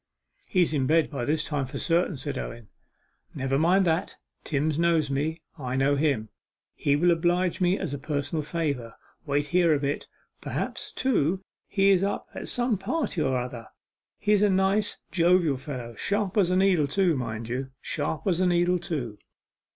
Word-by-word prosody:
'He's 175 Hz, -4 st, +2 dB
in 135 Hz, -3 st, +1 dB
bed 160 Hz, +1 st, +3 dB
by 135 Hz, -5 st, -3 dB
this 150 Hz, +2 st, +1 dB
time 145 Hz, -4 st, -1 dB
for -, -, -6 dB
certain,' 170 Hz, -1 st, +1 dB
said 140 Hz, +2 st, -3 dB
Owen. 115 Hz, -4 st, -6 dB, 0.7 s
'Never 135 Hz, +1 st, 0 dB
mind 185 Hz, +4 st, +4 dB
that 165 Hz, +1 st, 0 dB, 0.3 s
Timms 150 Hz, +1 st, 0 dB
knows 165 Hz, -4 st, +2 dB
me, 160 Hz, +4 st, -2 dB, 0.2 s
I 130 Hz, -2 st, -3 dB
know 135 Hz, +2 st, +3 dB
him. 140 Hz, -7 st, 0 dB, 0.4 s
He'll 145 Hz, +5 st, +2 dB
oblige 175 Hz, +2 st, +1 dB
me 180 Hz, +2 st, +3 dB
as -, -, -3 dB
a 140 Hz, -, -4 dB
personal 145 Hz, +2 st, -2 dB
favour. 145 Hz, -7 st, -3 dB, 0.3 s
Wait 145 Hz, +1 st, +1 dB
here 170 Hz, -3 st, +4 dB
a -, -, 0 dB
bit. 140 Hz, 0 st, -2 dB, 0.3 s
Perhaps, -, -, -4 dB
too, 190 Hz, -, +1 dB, 0.2 s
he's 195 Hz, -2 st, +3 dB
up 200 Hz, -, -1 dB
at -, -, -6 dB
some 240 Hz, -5 st, 0 dB
party 225 Hz, -, -1 dB
or 135 Hz, -3 st, +1 dB
another 125 Hz, -2 st, -5 dB, 0.5 s
he's 210 Hz, -1 st, +2 dB
a 210 Hz, -, +4 dB
nice, 195 Hz, +2 st, +2 dB
jovial 170 Hz, -5 st, +3 dB
fellow, 130 Hz, -4 st, -6 dB
sharp 200 Hz, -, -1 dB
as 195 Hz, -5 st, +3 dB
a 180 Hz, -, +2 dB
needle, 185 Hz, -6 st, +3 dB
too; 175 Hz, +2 st, +2 dB
mind 115 Hz, -3 st, -4 dB
you, 130 Hz, +3 st, -3 dB
sharp 155 Hz, -1 st, -2 dB
as 180 Hz, -4 st, +1 dB
a 185 Hz, -, +3 dB
needle, 175 Hz, 0 st, +2 dB
too. 130 Hz, -11 st, -4 dB
160 Hz, 170 wpm, -26 LUFS, 140-180 Hz, 0.7 s, mind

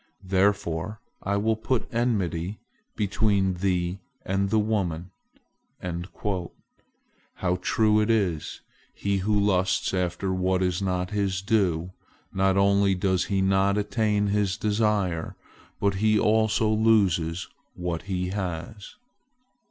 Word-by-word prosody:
Therefore 100 Hz, 0 st, 0 dB, 0.2 s
I 100 Hz, +1 st, 0 dB
will 110 Hz, +2 st, +1 dB
put 110 Hz, +3 st, -1 dB
enmity 105 Hz, -6 st, -1 dB, 0.4 s
between 100 Hz, -2 st, +1 dB
thee 90 Hz, 0 st, -1 dB, 0.3 s
and 95 Hz, +1 st, 0 dB
the 110 Hz, -, +2 dB
woman." 95 Hz, -5 st, -1 dB, 2.2 s
How 90 Hz, -1 st, 0 dB
true 110 Hz, +2 st, +3 dB
it 105 Hz, -, 0 dB
is—he 100 Hz, 0 st, -2 dB
who 105 Hz, +2 st, +1 dB
lusts 95 Hz, -2 st, +1 dB
after 90 Hz, +1 st, -1 dB
what 95 Hz, 0 st, +1 dB
is 90 Hz, 0 st, 0 dB
not 90 Hz, -1 st, -1 dB
his 100 Hz, -2 st, -1 dB
due, 90 Hz, -5 st, +1 dB, 0.4 s
not 95 Hz, 0 st, +2 dB
only 100 Hz, 0 st, +3 dB
does 95 Hz, 0 st, +1 dB
he 95 Hz, +2 st, 0 dB
not 95 Hz, +1 st, +2 dB
attain 105 Hz, 0 st, +1 dB
his 100 Hz, -2 st, 0 dB
desire, 105 Hz, -5 st, 0 dB, 0.4 s
but 100 Hz, 0 st, +2 dB
he 110 Hz, 0 st, +4 dB
also 110 Hz, +1 st, +2 dB
loses 100 Hz, -6 st, +2 dB, 0.3 s
what 90 Hz, -2 st, -3 dB
he 90 Hz, -1 st, -1 dB
has! 95 Hz, +1 st, -5 dB
100 Hz, 115 wpm, -26 LUFS, 90-105 Hz, 2.2 s, he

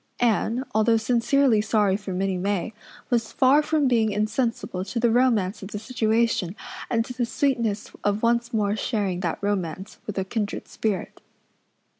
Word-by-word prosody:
Anne, 240 Hz, +2 st, +1 dB
although 220 Hz, +1 st, +4 dB
sincerely 240 Hz, +1 st, +3 dB
sorry 210 Hz, -3 st, +2 dB
for 200 Hz, -1 st, -5 dB
Minnie 190 Hz, +1 st, -1 dB
May, 200 Hz, +2 st, -1 dB, 0.4 s
was 230 Hz, -2 st, +1 dB
far 270 Hz, +3 st, +4 dB
from 305 Hz, -2 st, +1 dB
being 225 Hz, -4 st, +2 dB
insensible 215 Hz, -2 st, -1 dB
to 210 Hz, +5 st, -3 dB
the 235 Hz, -1 st, +3 dB
romance 225 Hz, -5 st, +2 dB
of 195 Hz, -, -7 dB
the 210 Hz, -, -5 dB
situation 220 Hz, -4 st, 0 dB, 0.3 s
and 230 Hz, -1 st, +1 dB
to 250 Hz, -, -7 dB
the 245 Hz, 0 st, -1 dB
sweetness 235 Hz, -4 st, -1 dB
of 205 Hz, +2 st, 0 dB
once 235 Hz, 0 st, +2 dB
more 210 Hz, -3 st, +1 dB
sharing 205 Hz, -5 st, -1 dB
that 175 Hz, -3 st, -2 dB
romance 195 Hz, -1 st, -3 dB
with 210 Hz, -, -5 dB
a 190 Hz, -, 0 dB
kindred 205 Hz, 0 st, -3 dB
spirit. 205 Hz, -5 st, -3 dB
220 Hz, 160 wpm, -25 LUFS, 200-235 Hz, 0.4 s, although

